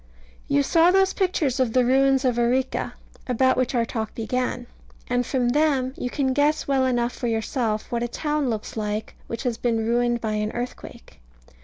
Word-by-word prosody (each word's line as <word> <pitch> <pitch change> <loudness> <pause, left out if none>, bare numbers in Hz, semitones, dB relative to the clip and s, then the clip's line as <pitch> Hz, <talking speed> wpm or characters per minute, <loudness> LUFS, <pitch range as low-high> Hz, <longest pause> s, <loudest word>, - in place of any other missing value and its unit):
You 140 0 +2
saw 330 - +4
those 385 +1 +3
pictures 320 -8 0
of 245 -4 +1
the 255 -1 +4
ruins 270 +1 +3
of 245 -2 +1
Arica, 255 +2 0 0.3
about 260 +1 +3
which 255 0 0
our 235 -1 +2
talk 220 -2 -4
began; 245 +2 -2 0.4
and 245 0 +1
from 250 -3 +1
them 270 -2 +1
you 250 - -3
can 265 0 0
guess 295 +3 +1
well 265 -2 +2
enough 240 -1 0
for 245 - -4
yourself 225 -1 -1
what 235 -1 -1
a 240 - 0
town 295 +2 -1
looks 220 -2 -4
like 210 0 -3
which 230 +2 -5
has 240 -3 -2
been 225 -2 0
ruined 240 +1 +1
by 220 -1 -2
an 210 0 -1
earthquake. 240 - -7
245 Hz, 185 wpm, -24 LUFS, 230-265 Hz, 0.4 s, saw